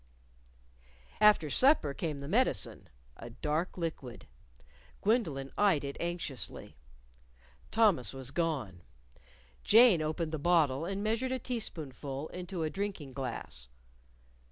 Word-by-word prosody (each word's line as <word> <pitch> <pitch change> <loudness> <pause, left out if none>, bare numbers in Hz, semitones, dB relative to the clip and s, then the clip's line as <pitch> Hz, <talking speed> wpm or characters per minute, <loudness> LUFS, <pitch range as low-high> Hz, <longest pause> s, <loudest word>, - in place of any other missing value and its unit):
_" - - -33 1.2
After 210 -8 +5
supper 260 - +4
came 150 0 -3
the 140 0 -7
medicine - - +1 0.3
a 120 - -9
dark 150 +10 -2
liquid. 160 -8 -5 0.8
Gwendolyn 165 - 0
eyed 195 -8 +3
it 140 0 -5
anxiously. 170 - -4 0.9
Thomas 210 - +3
was 135 -1 -7
gone. 140 - -2 0.8
Jane 225 -7 +7
opened 155 +1 -2
the 155 - -3
bottle 155 -3 +2
and 195 +2 -3
measured 230 +4 0
a 260 - 0
teaspoonful 155 - -5
into 180 -1 -5
a 155 - 0
drinking 190 -9 -4
glass. 120 - -5
160 Hz, 115 wpm, -31 LUFS, 140-195 Hz, 1.2 s, Jane